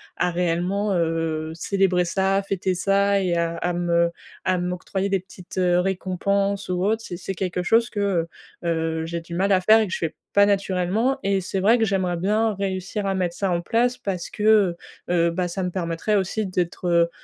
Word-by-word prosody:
à 180 Hz, -, 0 dB
réellement, 180 Hz, +4 st, 0 dB
heu, 165 Hz, -2 st, -1 dB
célébrer 185 Hz, 0 st, +1 dB
ça, 190 Hz, +2 st, +1 dB
fêter 190 Hz, -1 st, 0 dB
ça 200 Hz, +2 st, +2 dB
et 180 Hz, -2 st, 0 dB
à 170 Hz, 0 st, -1 dB
à 180 Hz, -, -1 dB
me 170 Hz, -1 st, +1 dB, 0.3 s
à 185 Hz, 0 st, +2 dB
m'octroyer 180 Hz, +2 st, -2 dB
des 195 Hz, -1 st, +1 dB
petites, 185 Hz, 0 st, -13 dB
heu, 180 Hz, -1 st, +3 dB
récompenses 195 Hz, +2 st, -1 dB
ou 180 Hz, +1 st, 0 dB
autres, 220 Hz, +2 st, 0 dB
c'est 175 Hz, -, -6 dB
c'est 190 Hz, +2 st, -5 dB
quelque 180 Hz, -1 st, -2 dB
chose 230 Hz, +5 st, +3 dB
que, 210 Hz, -, -5 dB
heu 190 Hz, -5 st, +1 dB, 0.4 s
heu, 160 Hz, -1 st, -1 dB
j'ai 170 Hz, +1 st, -3 dB
du 170 Hz, +1 st, -8 dB
mal 195 Hz, +3 st, +1 dB
à 190 Hz, -, +5 dB
faire 215 Hz, +4 st, +5 dB
et 215 Hz, -, 0 dB
que -, -, -8 dB
je -, -, 0 dB
fais 165 Hz, -2 st, -3 dB, 0.2 s
pas 200 Hz, 0 st, +6 dB
naturellement 200 Hz, +5 st, +1 dB
et 195 Hz, -1 st, +1 dB
c'est 190 Hz, +1 st, -3 dB
vrai 220 Hz, +6 st, +4 dB
que 225 Hz, -, +3 dB
j'aimerais 190 Hz, -3 st, 0 dB
bien 210 Hz, +5 st, +1 dB
réussir 195 Hz, +1 st, -3 dB
à 195 Hz, -, 0 dB
mettre 180 Hz, -2 st, -1 dB
ça 195 Hz, -, -1 dB
en 170 Hz, -1 st, 0 dB
place 240 Hz, +6 st, +1 dB
parce 185 Hz, -3 st, -4 dB
que, 210 Hz, -, -6 dB
heu 205 Hz, -5 st, +4 dB, 0.3 s
heu, 170 Hz, -1 st, +2 dB
bah, 180 Hz, +1 st, -1 dB
ça 185 Hz, +2 st, -3 dB
me 180 Hz, -, -2 dB
permettrait 170 Hz, +3 st, -1 dB
aussi 205 Hz, +2 st, 0 dB
d'être, 180 Hz, -1 st, -2 dB
heu 170 Hz, -1 st, +3 dB
185 Hz, 210 wpm, -23 LUFS, 175-200 Hz, 0.4 s, pas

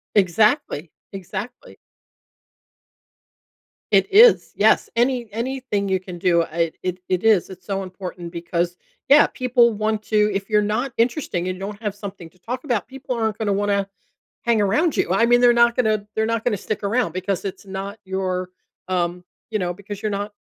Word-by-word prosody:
Exactly, 200 Hz, -, +2 dB, 0.2 s
exactly. 200 Hz, +6 st, -7 dB, 2.2 s
It -, -, +3 dB
is, 465 Hz, +4 st, +6 dB
yes. -, -, +3 dB
Any 240 Hz, 0 st, +1 dB
anything 235 Hz, -4 st, -2 dB
you 190 Hz, -1 st, +2 dB
can 180 Hz, -1 st, -9 dB
do, 170 Hz, -2 st, +3 dB
I 165 Hz, 0 st, -1 dB
it 180 Hz, 0 st, -2 dB
it 185 Hz, +3 st, 0 dB
is, 210 Hz, -6 st, +4 dB
it's 185 Hz, -1 st, -12 dB
so 195 Hz, -1 st, -2 dB
important 185 Hz, -2 st, -7 dB
because, 170 Hz, 0 st, -2 dB, 0.3 s
yeah, 290 Hz, +2 st, +7 dB
people 245 Hz, -2 st, +2 dB
want 215 Hz, 0 st, -1 dB
to 210 Hz, -1 st, +2 dB
if 195 Hz, +1 st, -3 dB
you're 210 Hz, -1 st, +3 dB
not 215 Hz, +5 st, -1 dB
interesting 230 Hz, -, 0 dB
and 185 Hz, -, -3 dB
you -, -, -13 dB
don't 205 Hz, +2 st, -6 dB
have 205 Hz, -2 st, -2 dB
something 195 Hz, -5 st, -8 dB
to 180 Hz, -, -29 dB
talk 245 Hz, +7 st, -5 dB
about, 240 Hz, -, -1 dB
people 265 Hz, -1 st, -5 dB
aren't 220 Hz, -2 st, -1 dB
gonna 215 Hz, -2 st, 0 dB
wanna 200 Hz, 0 st, 0 dB, 0.6 s
hang 235 Hz, -2 st, +2 dB
around 225 Hz, -, +2 dB
you. -, -, +2 dB
I 195 Hz, +5 st, +4 dB
mean, 240 Hz, 0 st, +5 dB
they're 245 Hz, -1 st, +6 dB
not 235 Hz, 0 st, +4 dB
gonna 215 Hz, -4 st, +1 dB
they're 220 Hz, -, +1 dB
not 230 Hz, 0 st, -1 dB
gonna 215 Hz, -5 st, 0 dB
stick 215 Hz, +2 st, -4 dB
around, 210 Hz, -3 st, +1 dB
because 185 Hz, +1 st, -2 dB
it's 195 Hz, -, -6 dB
not 195 Hz, +2 st, -6 dB
your, 185 Hz, -1 st, -2 dB, 0.4 s
um 180 Hz, -1 st, -1 dB, 0.3 s
you 215 Hz, -, 0 dB
know, 175 Hz, -1 st, -1 dB
because 200 Hz, +1 st, -9 dB
you're 215 Hz, -, -1 dB
not 205 Hz, +1 st, -3 dB
205 Hz, 180 wpm, -22 LUFS, 185-230 Hz, 2.2 s, yeah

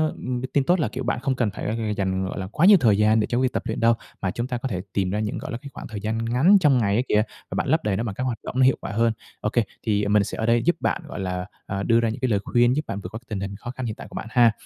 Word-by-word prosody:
ừm, 125 Hz, -1 st, -4 dB
tin 140 Hz, -, +3 dB
tốt 175 Hz, +5 st, +2 dB
là, -, -, +1 dB
kiểu, 130 Hz, +1 st, -5 dB
bạn 120 Hz, -, -1 dB
không 130 Hz, +1 st, 0 dB
cần 120 Hz, -4 st, +1 dB
phải 110 Hz, +1 st, -2 dB
dành, 95 Hz, -1 st, 0 dB
gọi 95 Hz, -, -4 dB
là, 95 Hz, -, -4 dB
quá 150 Hz, -, +1 dB
nhiều 205 Hz, 0 st, +9 dB
thời 110 Hz, -5 st, +4 dB
gian 110 Hz, +1 st, +4 dB
để 105 Hz, -, +1 dB
cho 120 Hz, -, 0 dB
việc 130 Hz, -1 st, +1 dB
tập -, -, -1 dB
luyện 110 Hz, -, -3 dB
đâu, 115 Hz, 0 st, +5 dB, 0.3 s
mà 95 Hz, -2 st, 0 dB
chúng 120 Hz, +1 st, -3 dB
ta 125 Hz, -2 st, -2 dB
có 130 Hz, -, -3 dB
thể 95 Hz, -5 st, -2 dB
tìm 95 Hz, -2 st, 0 dB
ra 105 Hz, -, -1 dB
những, 105 Hz, -1 st, -2 dB
gọi -, -, -6 dB
là, 115 Hz, -, -3 dB
cái 140 Hz, -, -9 dB
khoảng -, -, -8 dB
thời 105 Hz, -3 st, -6 dB
gian 110 Hz, +1 st, -2 dB
ngắn 135 Hz, -, +5 dB
trong 145 Hz, -6 st, +4 dB
ngày 100 Hz, -4 st, +2 dB
á 120 Hz, -, +3 dB
kìa, 105 Hz, 0 st, +4 dB, 0.3 s
và -, -, -3 dB
bạn -, -, -1 dB
lấp -, -, +2 dB
đầy 100 Hz, -2 st, 0 dB
nó 115 Hz, -, -1 dB
bằng 105 Hz, -4 st, -4 dB
các 130 Hz, -, -3 dB
hoạt 125 Hz, -3 st, -2 dB
động -, -, -6 dB
nó 130 Hz, -, +6 dB
hiệu 130 Hz, -, +4 dB
quả -, -, -5 dB
hơn. 115 Hz, +2 st, +2 dB, 0.3 s
OK, 105 Hz, -, -2 dB, 0.3 s
thì 105 Hz, -2 st, +1 dB
mình 105 Hz, 0 st, +4 dB
sẽ -, -, -5 dB
ở 110 Hz, -, -1 dB
đây 115 Hz, 0 st, +3 dB
giúp 175 Hz, -, +3 dB
bạn, -, -, 0 dB
gọi -, -, -7 dB
là, 90 Hz, -1 st, -3 dB, 0.2 s
ờ, 100 Hz, 0 st, -3 dB
đưa 115 Hz, +2 st, +4 dB
ra 115 Hz, -1 st, +1 dB
những 115 Hz, -, -5 dB
cái 130 Hz, -1 st, 0 dB
lời 105 Hz, -, +2 dB
khuyên 120 Hz, +1 st, +3 dB
giúp 150 Hz, +1 st, -1 dB
bạn 100 Hz, -, -3 dB
vượt 90 Hz, -, -7 dB
qua 110 Hz, -, -5 dB
tình 105 Hz, -, -3 dB
hình 100 Hz, 0 st, -4 dB
khó 120 Hz, +4 st, -7 dB
khăn 130 Hz, -1 st, -5 dB
hiện 110 Hz, -1 st, -3 dB
tại -, -, -10 dB
của -, -, -13 dB
bạn -, -, -5 dB
ha. 120 Hz, -2 st, +5 dB
115 Hz, 345 wpm, -24 LUFS, 105-125 Hz, 0.3 s, nhiều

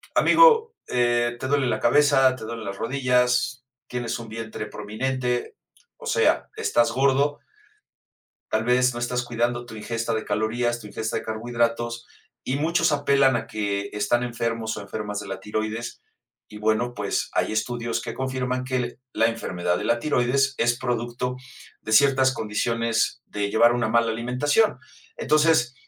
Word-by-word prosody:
amigo, 460 Hz, -2 st, +5 dB
eh, 120 Hz, -1 st, +1 dB
¿te 130 Hz, -, -3 dB
duele 140 Hz, 0 st, +2 dB
la -, -, 0 dB
cabeza, 135 Hz, 0 st, +4 dB
te 130 Hz, -, -10 dB
duelen 115 Hz, 0 st, -6 dB
las 100 Hz, 0 st, -5 dB
rodillas, 125 Hz, 0 st, +1 dB, 0.2 s
tienes 120 Hz, -2 st, -3 dB
un 115 Hz, -1 st, -9 dB
vientre 110 Hz, -1 st, -6 dB
prominente? 125 Hz, +4 st, -3 dB, 0.4 s
O -, -, -12 dB
sea, -, -, +2 dB
estás 120 Hz, 0 st, +2 dB
gordo" 140 Hz, +3 st, +2 dB, 1.1 s
"tal 110 Hz, -, +1 dB
vez 125 Hz, +1 st, +3 dB
no 120 Hz, -, -5 dB
estás 125 Hz, +1 st, -1 dB
cuidando 120 Hz, 0 st, -1 dB
tu 120 Hz, -, -10 dB
ingesta 115 Hz, +1 st, -3 dB
de 110 Hz, 0 st, -2 dB
calorías, 120 Hz, +3 st, -1 dB
tu 105 Hz, -, -10 dB
ingesta 110 Hz, +2 st, -3 dB
de -, -, -5 dB
carbohidratos", 120 Hz, +1 st, -2 dB, 0.4 s
y 130 Hz, -, -1 dB
muchos 160 Hz, +3 st, +2 dB
apelan 140 Hz, -3 st, +3 dB
a 115 Hz, 0 st, -6 dB
que 100 Hz, -2 st, -2 dB
están 105 Hz, +3 st, +1 dB
enfermos 115 Hz, -2 st, -2 dB
o 110 Hz, -, -6 dB
enfermas 105 Hz, 0 st, -5 dB
de 105 Hz, -, -9 dB
la 95 Hz, 0 st, -5 dB
tiroides, 110 Hz, +3 st, -4 dB, 0.5 s
y 105 Hz, -, -10 dB
bueno, 110 Hz, +3 st, 0 dB
pues 105 Hz, -4 st, -2 dB
hay -, -, 0 dB
estudios 115 Hz, +1 st, -2 dB
que -, -, -5 dB
confirman 130 Hz, -1 st, -2 dB
que 125 Hz, -2 st, -2 dB
la 115 Hz, -, +3 dB
enfermedad 90 Hz, -6 st, -2 dB
de -, -, -4 dB
la 120 Hz, -, +2 dB
tiroides 135 Hz, 0 st, +1 dB
es 120 Hz, +1 st, +2 dB
producto 125 Hz, 0 st, -2 dB, 0.4 s
de 110 Hz, -, -3 dB
ciertas 130 Hz, +1 st, +5 dB
condiciones 115 Hz, +2 st, -1 dB
de 100 Hz, -1 st, -3 dB
llevar 115 Hz, +3 st, +5 dB
una 120 Hz, -2 st, 0 dB
mala 115 Hz, 0 st, +2 dB
alimentación. 125 Hz, -, +1 dB, 0.4 s
Entonces, 150 Hz, -3 st, +3 dB
120 Hz, 155 wpm, -24 LUFS, 110-130 Hz, 1.1 s, amigo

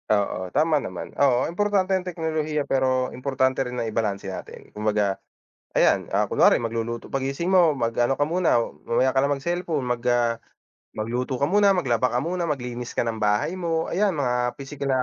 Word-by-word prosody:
Oo 100 Hz, -3 st, 0 dB
tama 155 Hz, -, +2 dB
naman 95 Hz, -7 st, -7 dB
oo 130 Hz, -3 st, +3 dB
importante 195 Hz, +1 st, +1 dB
yung 185 Hz, -1 st, -1 dB
teknolohiya, 155 Hz, -3 st, -2 dB
pero 130 Hz, -1 st, +1 dB
importante 130 Hz, 0 st, 0 dB
rin 125 Hz, -1 st, -3 dB
na 115 Hz, -, -1 dB
ibalanse 105 Hz, -3 st, -2 dB
natin -, -, -10 dB
kumbaga 105 Hz, -2 st, 0 dB, 0.6 s
ayan. -, -, +3 dB
Ah, -, -, +1 dB
kunwari -, -, +4 dB
magluluto, 115 Hz, 0 st, -3 dB
pag-gising 135 Hz, +5 st, -2 dB
mo 175 Hz, -4 st, +6 dB
mag 115 Hz, -2 st, -1 dB
ano 120 Hz, +3 st, +1 dB
ka 145 Hz, -, +3 dB
muna 170 Hz, -6 st, +2 dB
o 115 Hz, -, -4 dB
mamaya 130 Hz, +2 st, +1 dB
ka 135 Hz, -, +4 dB
na 140 Hz, -, +1 dB
mag 140 Hz, -, 0 dB
cellphone 170 Hz, -5 st, -1 dB
mag, 125 Hz, -1 st, -1 dB
ah, 120 Hz, -1 st, +2 dB, 0.6 s
magluto 125 Hz, +4 st, -3 dB
ka 140 Hz, -, +3 dB
muna, 200 Hz, +2 st, +4 dB
maglaba 125 Hz, -8 st, +1 dB
ka 120 Hz, -, +1 dB
muna, 175 Hz, +4 st, -2 dB
maglinis 125 Hz, -5 st, -4 dB
ka -, -, +2 dB
ng 115 Hz, -1 st, -2 dB
bahay 105 Hz, +8 st, +1 dB
mo, 165 Hz, -3 st, -1 dB
ayan 200 Hz, +2 st, +1 dB
mga 125 Hz, -3 st, 0 dB
pisikal 140 Hz, 0 st, -5 dB
na 130 Hz, -1 st, +2 dB
130 Hz, 190 wpm, -24 LUFS, 120-160 Hz, 0.6 s, mo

